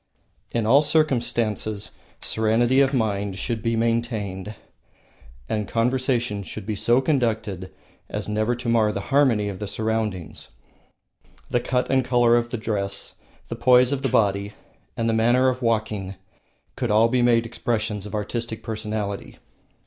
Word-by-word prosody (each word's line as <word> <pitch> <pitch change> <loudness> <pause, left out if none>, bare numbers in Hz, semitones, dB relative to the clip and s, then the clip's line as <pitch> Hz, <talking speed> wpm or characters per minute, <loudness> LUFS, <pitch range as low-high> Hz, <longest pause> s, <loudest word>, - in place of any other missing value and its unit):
In 115 -2 -1
all 135 +6 +6
circumstances 120 -8 0 0.3
serenity 115 +4 +2
of 135 -1 +3
mind 100 -6 -1
should 115 +2 -3
be 115 +1 0
maintained, 110 -4 -2 0.9
and 105 -2 -2
conversation 120 -2 0
should 100 +1 -8
be 105 0 -2
conducted 115 - 0 0.4
as 105 0 -4
never 110 +3 0
to 120 0 -7
mar 115 -2 +3
the 100 - -3
harmony 125 -8 +3
of 95 -2 -5
the 105 - -4
surroundings. 110 -5 -3 1.0
The 120 - +2
cut 125 +1 -1
and 130 -1 +3
color 120 -1 +4
of 120 0 +1
the 120 - -3
dress, 105 -3 -3 0.3
the 115 - -5
poise 125 +2 +5
of 140 -1 -1
the 135 - 0
body, 100 -2 +1 0.4
and 115 - 0
the 115 - +2
manner 120 +4 +4
of 130 0 -3
walking 110 -4 -1 0.6
could 125 -3 -2
all 110 +2 +5
be 125 +1 +1
made 120 -1 +3
expressions 110 -3 -2
of 105 - -6
artistic 110 +2 -3
personality. 105 -2 -4
115 Hz, 145 wpm, -24 LUFS, 105-120 Hz, 1.0 s, all